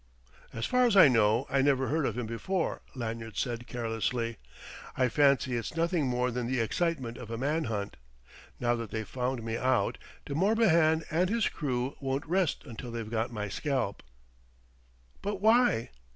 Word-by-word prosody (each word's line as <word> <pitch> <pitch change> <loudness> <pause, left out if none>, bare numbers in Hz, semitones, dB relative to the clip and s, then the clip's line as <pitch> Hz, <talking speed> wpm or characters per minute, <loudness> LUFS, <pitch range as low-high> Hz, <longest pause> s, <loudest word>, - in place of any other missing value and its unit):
"As 115 0 -3
far 250 0 +3
as 210 -4 +2
I 185 - +10
know, 115 0 +3
I 135 - +2
never 135 -1 +2
heard 155 -1 +1
of 115 - -3
him 125 - -2
before," 165 - -2
Lanyard 115 -3 -5
said 120 -1 -2
carelessly. 115 0 -2 0.6
"I 130 -1 +3
fancy 140 -2 +3
it's 120 +6 -4
nothing 165 -3 +1
more 125 0 0
than 120 0 -2
the 130 0 0
excitement 130 0 -1
of 120 -3 -9
a 115 - -4
man 150 +6 0
hunt. 105 -3 -4 0.6
Now 120 -1 +2
that 115 -2 -5
they've 110 0 -4
found 125 -1 -2
me 115 0 -2
out, 130 +1 +1 0.3
De 140 - -5
Morbihan 170 -4 +3
and 175 +4 +2
his 230 0 +2
crew 130 -3 -2
won't 135 0 -2
rest 180 0 0
until 120 -1 -8
they've 115 -2 -5
got 115 +1 -1
my 105 -3 -3
scalp." 130 -2 -2 1.2
"But 205 -1 -3
why?" 220 - +3
130 Hz, 170 wpm, -30 LUFS, 115-160 Hz, 1.2 s, I